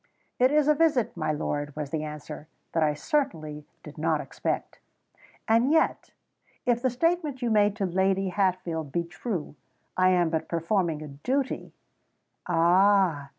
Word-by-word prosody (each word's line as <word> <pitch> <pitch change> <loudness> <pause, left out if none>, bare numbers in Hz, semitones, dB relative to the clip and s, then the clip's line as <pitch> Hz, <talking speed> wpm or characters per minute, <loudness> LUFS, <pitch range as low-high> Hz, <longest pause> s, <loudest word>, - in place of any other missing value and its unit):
"It 255 +1 +5
is 300 -1 +3
a 300 - +6
visit, 300 -6 +2
my 155 -3 -1
lord," 145 -1 -3
was 150 -2 -5
the 155 -1 -2
answer, 150 0 -8 0.2
"that 165 - 0
I 150 -1 +2
certainly 155 - -2 0.2
did 150 0 -11
not 160 -1 +1
expect." - - -4 0.7
"And 230 +4 +3
yet—if 250 -5 -2
the 260 - +2
statement 300 0 0
you 235 - +1
made 205 -1 +3
to 205 -3 -1
Lady 190 +1 +1
Hatfield 180 -6 -1
be 170 +2 0
true—I 175 - -3
am 175 -3 +2
but 160 -1 -1
performing 165 -2 0
a - - -7
duty——" 255 - -2 0.8
"Ah! 175 -3 +3
180 Hz, 145 wpm, -27 LUFS, 155-235 Hz, 0.8 s, a